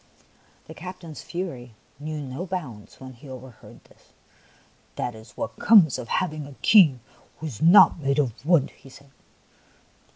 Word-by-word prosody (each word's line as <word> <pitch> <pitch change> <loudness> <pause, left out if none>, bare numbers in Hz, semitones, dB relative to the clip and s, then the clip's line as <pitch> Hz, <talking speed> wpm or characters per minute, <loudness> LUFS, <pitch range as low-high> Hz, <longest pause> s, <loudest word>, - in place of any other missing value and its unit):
The - - -11
captain's 180 -2 -10
fury 130 - -7 0.2
knew 155 +1 -5
no 140 +6 -6
bounds 145 - -7
when 130 0 -10
he 125 +3 -15
overheard 130 -2 -13
this. - - -26 0.4
" - - -34
That 120 - -3
is 110 +1 -15
what - - -6
comes 200 - +5
of 120 - -7
hav 180 +6 -1
ing 150 -2 -7
a 140 - -13
king 155 - +5 0.4
who 160 - -8
is 125 -9 -7
not 170 +1 +6
made 140 -1 -1
of 130 -5 -2
wood," 160 -3 +2
he 135 - -18
said. 135 +1 -17
145 Hz, 165 wpm, -24 LUFS, 130-170 Hz, 0.4 s, not